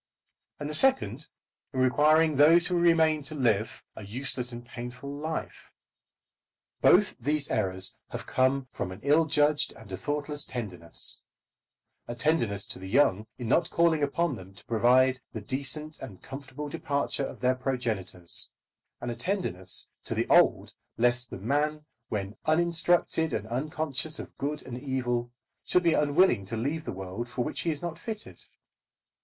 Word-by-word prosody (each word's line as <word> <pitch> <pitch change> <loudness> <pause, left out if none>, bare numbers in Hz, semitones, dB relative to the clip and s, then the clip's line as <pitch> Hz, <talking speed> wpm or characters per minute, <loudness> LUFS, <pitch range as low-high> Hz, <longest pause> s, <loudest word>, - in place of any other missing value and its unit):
And 145 - -4
the 150 - -4
second, 265 - +3 0.5
in 130 - -2
requiring 150 +4 +4
those 160 +5 +6
who 180 - -1
remain 165 -3 +4
to 150 +2 -6
live 110 -6 0
a 110 - -8
useless 125 +3 -1
and 120 0 -8
painful 125 +3 -7
life. 155 +2 -5 1.1
Both 190 +2 +5
these 145 +3 0
errors 95 -3 +1
have - - -6
come 130 +1 +1
from 95 - -4
an 95 +3 -9
ill 150 +4 +4
judged 150 -1 +2
and 110 -3 -14
a 95 - -3
thoughtless 145 +2 -2
tenderness, 95 -9 -2 0.9
a 120 - -5
tenderness 115 -8 +1
to - - -6
the 95 0 -8
young 110 -4 +3
in 120 - -5
not 165 +7 +2
calling 165 -2 +3
upon 145 +1 0
them 95 0 -12
to - - -17
provide 125 +3 +4
for - - -32 0.2
the 105 - -14
decent 150 +4 -4
and 105 -8 -10
comfortable 140 +2 -7
departure 140 -1 -1
of - - -10
their 125 0 +3
progenitors; 115 -9 0 0.5
and 120 - -3
a - - -4
tenderness 115 - -2 0.2
to - - -2
the - - +1
old - - +4 0.2
lest 120 +1 +2
the - - -6
man, 150 +8 -1 0.2
when 100 0 -3
uninstructed 165 0 +2
and 105 - -2
unconscious 155 +3 -3
of - - -9
good 150 +2 -3
and 125 -1 -7
evil, 120 -3 -1 0.3
should 180 - +2
be 170 -1 +4
unwilling 150 - +3
to 110 +4 -4
leave 150 +7 -2
the - - -3
world 95 +5 -6
for 120 0 -2
which - - -3
he 170 - -1
is 150 -1 -3
not 165 -1 -4
fitted. 220 +3 -7
135 Hz, 160 wpm, -28 LUFS, 115-155 Hz, 1.1 s, those